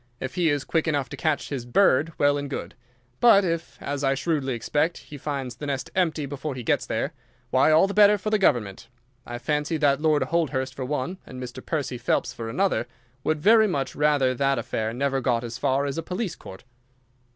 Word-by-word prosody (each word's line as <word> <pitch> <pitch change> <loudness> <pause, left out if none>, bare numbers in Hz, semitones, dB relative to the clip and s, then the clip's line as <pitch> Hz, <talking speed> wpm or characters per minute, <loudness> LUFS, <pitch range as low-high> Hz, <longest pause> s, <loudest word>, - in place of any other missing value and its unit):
If 130 0 -5
he 175 -3 +2
is 145 -2 0
quick 165 -1 0
enough 145 -4 0
to - - -6
catch 155 -2 -1
his 135 -4 -4
bird, 145 +3 +3
well 145 0 +3
and 145 -1 -4
good. 140 - -5 0.5
But 200 -5 +6
if, 165 -1 -3
as 140 0 -4
I 135 0 +2
shrewdly 135 -5 -1
suspect, 150 +8 0
he 145 - -12
finds 135 -5 -4
the 145 - -6
nest 135 -2 -3
empty 165 -5 +1
before 140 +1 -5
he 125 - -6
gets - - 0
there, - - -2 0.4
why, 130 +4 +4
all 155 +4 +6
the 195 - -3
better 210 0 +6
for 215 +2 -4
the 215 - +3
government. 105 - +1 0.4
I 120 - -5
fancy 150 +5 -1
that 145 -2 +2
Lord 155 -2 +3
Holdhurst 135 -6 -1
for 130 -1 -5
one, 145 +6 -3
and 130 - -10
Mr. 125 +1 -7
Percy 135 -6 -3
Phelps 120 0 0
for 115 -2 -6
another, 190 +11 0 0.4
would 155 -1 0
very 220 +1 +6
much 140 -8 -2
rather 145 -3 +2
that 135 +2 +1
the - - -2
affair 110 0 -2
never 135 +2 -1
got 120 -2 +1
as 120 0 -6
far 135 +2 +1
as 140 +3 -3
a - - -4
police 185 -1 -3
court. 95 +4 -12
145 Hz, 215 wpm, -25 LUFS, 130-160 Hz, 0.5 s, But